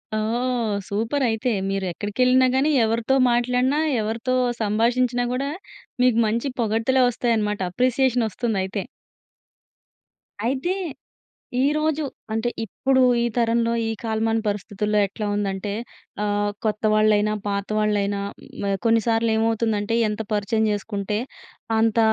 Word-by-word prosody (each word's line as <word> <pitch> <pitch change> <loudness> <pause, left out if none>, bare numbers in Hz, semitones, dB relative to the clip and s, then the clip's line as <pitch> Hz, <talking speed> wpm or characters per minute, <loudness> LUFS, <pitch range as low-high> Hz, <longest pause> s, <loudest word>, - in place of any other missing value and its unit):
ఓహ్! 230 +1 0
Super 225 +7 -1
అయితే. 225 +3 0 0.2
మీరు 195 -1 -1
ఎక్కడికెళ్ళినా 250 +7 +2
గానీ, 280 +4 +3
ఎవరితో 230 +4 +1 0.2
మాట్లాడినా, 250 +4 +1 0.2
ఎవరితో 230 +4 -1 0.3
సంభాషించినా 240 +3 +1
గూడా, 270 +3 -1 0.5
మీకు 250 -3 +4
మంచి 230 +5 -1
పొగడ్తలే 230 +3 +2
వస్తాయన్నమాట. 220 -3 0
అప్రిసియేషన్ 250 +3 +2
వస్తుందయితే. 200 -3 -2 1.6
అయితే, 270 +9 0 0.9
ఈరోజు 305 +1 +1 0.3
అంటే 225 +2 0 0.2
ఇప్పుడు 260 +5 +1 0.2
ఈ - - +1
తరంలో 230 0 +2
ఈ - - -1
కాలమాన 225 0 0
పరిస్థితుల్లో 210 +1 -1
ఎట్లా 210 +2 -5
ఉందంటే, 200 0 -2 0.5
ఆహ్, 205 0 0
కొత్తవాళ్ళైనా, 215 -1 +2
పాతవాళ్లైన, 205 0 0 0.3
హ్మ్. 200 -1 -3
కొన్నిసార్లేమవుతుందంటే, 225 -1 +1
ఎంత 210 +1 -4
పరిచయం 210 +2 +1
చేసుకుంటే 205 0 -3 0.6
అంత 225 0 +2
225 Hz, 100 wpm, -23 LUFS, 210-245 Hz, 1.6 s, మీకు